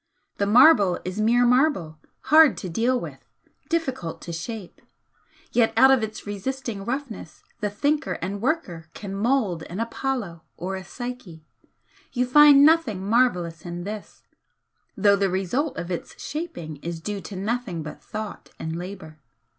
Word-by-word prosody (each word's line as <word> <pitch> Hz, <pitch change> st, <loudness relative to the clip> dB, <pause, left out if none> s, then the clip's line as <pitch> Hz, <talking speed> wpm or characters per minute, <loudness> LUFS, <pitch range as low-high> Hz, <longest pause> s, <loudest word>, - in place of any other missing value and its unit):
The 200 Hz, -, 0 dB
marble 210 Hz, -, +6 dB
is 185 Hz, +4 st, -3 dB
mere 240 Hz, +3 st, +4 dB
marble, 245 Hz, -, +2 dB, 0.3 s
hard 315 Hz, -2 st, +7 dB
to 185 Hz, -, -5 dB
deal 240 Hz, +8 st, +1 dB
with, -, -, -8 dB, 0.5 s
difficult 265 Hz, -, -2 dB
to 170 Hz, -, -6 dB
shape, 190 Hz, +3 st, -7 dB, 0.7 s
yet 235 Hz, -2 st, +3 dB
out 265 Hz, +3 st, +7 dB
of 265 Hz, -3 st, +4 dB
its 220 Hz, 0 st, -5 dB
resisting 210 Hz, +1 st, -4 dB
roughness 240 Hz, -, -5 dB, 0.2 s
the 210 Hz, -2 st, -1 dB
thinker 290 Hz, +9 st, 0 dB
and 195 Hz, +3 st, -4 dB
worker 195 Hz, -, -2 dB
can 200 Hz, -2 st, -7 dB
mould 210 Hz, -5 st, 0 dB
an 180 Hz, +5 st, -6 dB
Apollo 230 Hz, -7 st, -3 dB, 0.2 s
or 185 Hz, +3 st, -4 dB
a 190 Hz, -, -6 dB
Psyche. 215 Hz, -7 st, -8 dB, 0.7 s
You 250 Hz, -1 st, +1 dB
find 285 Hz, +2 st, +7 dB
nothing 275 Hz, -, +3 dB
marvellous 180 Hz, -9 st, +1 dB
in 175 Hz, 0 st, -6 dB
this, 210 Hz, +2 st, -8 dB, 0.7 s
though 200 Hz, 0 st, +5 dB
the 200 Hz, -1 st, +1 dB
result 195 Hz, -, -1 dB
of 175 Hz, -, -5 dB
its 175 Hz, -, -6 dB
shaping 295 Hz, -, -6 dB
is 170 Hz, +3 st, -6 dB
due 200 Hz, +4 st, -4 dB
to 200 Hz, -, -9 dB
nothing 200 Hz, -4 st, -3 dB
but 150 Hz, -, -9 dB
Thought 215 Hz, 0 st, -7 dB
and 160 Hz, 0 st, -4 dB
Labour. 175 Hz, -3 st, -8 dB
210 Hz, 150 wpm, -24 LUFS, 180-255 Hz, 0.7 s, hard